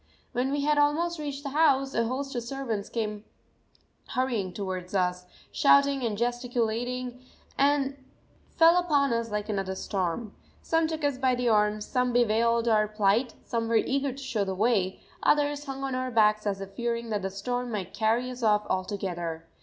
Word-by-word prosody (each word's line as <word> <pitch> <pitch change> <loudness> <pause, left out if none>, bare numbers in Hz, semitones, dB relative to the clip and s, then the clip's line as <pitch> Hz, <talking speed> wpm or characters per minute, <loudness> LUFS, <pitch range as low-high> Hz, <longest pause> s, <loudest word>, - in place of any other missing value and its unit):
When 255 +2 -1
we 285 0 0
had 295 +1 +2
almost 320 +3 +1
reached 285 -2 -5
the 280 - -3
house, 275 -3 +3
a 230 -1 +1
host 270 +3 -3
of 240 - -2
servants 235 -4 -4
came 210 -2 -3 0.8
hurrying 245 -8 -1
towards 185 -1 -5
us, 180 -1 0 0.2
shouting 280 -1 +4
and 220 -3 -1
gesticulating, 245 +1 -2 0.3
and 280 -1 +1 0.5
fell 330 +1 +6
upon 285 -7 +2
us 230 0 -1
like 210 0 -3
another 195 -3 -2
storm. 195 +3 -3 0.3
Some 325 0 +2
took 315 -1 -4
us 285 -3 0
by 260 -1 +2
the 245 -1 0
arms, 210 -1 +2
some 250 -1 0
bewailed 235 0 +2
our 215 -2 +3
plight, 215 +3 +1
some 230 -1 -2
were 230 - +1
eager 275 +4 +1
to 275 +2 -9
show 240 -6 -1
the 190 -1 -3
way, 200 -3 +1 0.2
others 290 0 +2
hung 270 -1 -5
on 270 -1 -2
our 255 0 -1
backs 215 -2 +3
as 195 -1 -1
if 195 0 -7
fearing 235 +2 -3
that 210 -1 0
the 195 - -2
storm 245 +6 -3
might 190 -4 -4
carry 230 +4 +1
us 250 0 -8
off 210 -2 +3
altogether. 180 -4 -3
235 Hz, 175 wpm, -28 LUFS, 210-270 Hz, 0.8 s, fell